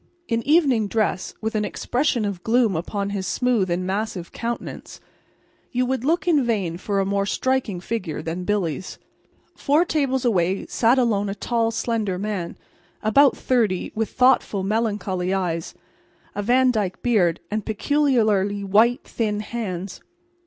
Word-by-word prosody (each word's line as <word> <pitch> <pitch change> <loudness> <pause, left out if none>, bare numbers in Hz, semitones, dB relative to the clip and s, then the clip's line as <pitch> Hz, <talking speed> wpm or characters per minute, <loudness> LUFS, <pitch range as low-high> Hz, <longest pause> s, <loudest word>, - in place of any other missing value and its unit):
In 230 0 0
evening 280 -9 +3
dress, 210 -3 -1
with 220 +1 -2
an 215 -1 0
expression 245 +1 0
of 195 -3 -4
gloom 230 -4 +2
upon 200 +4 -3
his 195 -2 -3
smooth 240 -7 +1
and 175 +1 -1
massive 195 -2 -3
countenance, 235 0 -5 0.7
you 250 0 +1
would 255 -1 -1
look 335 +6 +1
in 305 -6 +4
vain 200 -8 -1
for 200 +2 -1
a 195 - +1
more 200 0 0
striking 260 -6 0
figure 185 -5 -4
than 170 +2 -4
Billy's. 185 -4 -2 0.6
Four 300 +5 +2
tables 270 -6 0
away 190 -4 +1
sat 235 +3 +2
alone 210 -5 +1
a 195 - -3
tall, 230 +2 0
slender 225 -4 -1
man, 195 -3 -4 0.5
about 270 +6 +4
thirty, 220 -8 0
with 220 0 -1
thoughtful, 250 -6 +2
melancholy 195 -3 -1
eyes, 170 -3 -2 0.6
a 205 - -3
Van 250 +4 +3
Dyke 200 -5 -2
beard 195 -9 +2
and 215 0 -1
peculiarly 215 -5 +1
white, 220 +5 +3
thin 210 -2 -2
hands. 200 -5 -5
215 Hz, 145 wpm, -23 LUFS, 190-245 Hz, 0.7 s, in